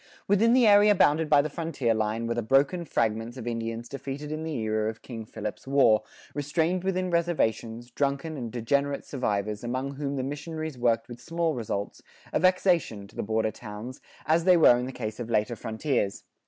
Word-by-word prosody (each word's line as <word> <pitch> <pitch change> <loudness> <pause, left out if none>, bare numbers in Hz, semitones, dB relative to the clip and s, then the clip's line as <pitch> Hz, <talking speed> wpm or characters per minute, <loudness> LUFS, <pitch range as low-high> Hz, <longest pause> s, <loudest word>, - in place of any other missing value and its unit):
[46:2] - - -26 0.2
Within 220 +4 +4
the 250 -1 +5
area 205 0 +6
bounded 155 -2 +3
by 145 -1 +6
the - - -1
frontier 145 -8 -1
line, 110 +1 -1
were 115 - -1
the 120 - -1
broken 135 +9 +2
fragments 115 -2 -1
of 120 - -7
Indians 115 0 -3
defeated 140 +2 -6
in 155 0 -3
the 160 -2 -3
era 110 -2 0
of 110 - -9
King 115 -3 -7
Philip's 105 +3 -6
War, 130 -6 +4 0.3
restrained 160 +5 0
within 185 -1 -1
reservations, 120 -9 -1
drunken 140 +4 -1
and 120 -5 -5
degenerate 140 +5 0
survivors, 105 -5 -2
among 130 +3 -2
whom 140 0 -3
the 130 - -2
missionaries 155 +2 -5
worked 120 -2 +1
with 120 0 -10
small 165 +4 -1
results, 105 -5 -4 0.3
a - - +2
vexation 175 - +2
to - - -20
the - - -2
border 110 +1 0
towns,[46:3] 110 +3 -9 0.2
as 165 +2 +3
they 180 -2 +6
were 155 -7 +7
in 125 - -3
the - - -5
case 110 -4 -5
of 120 -1 -5
later 110 +1 +1
frontiers. 110 -2 -2
130 Hz, 195 wpm, -27 LUFS, 115-160 Hz, 0.3 s, were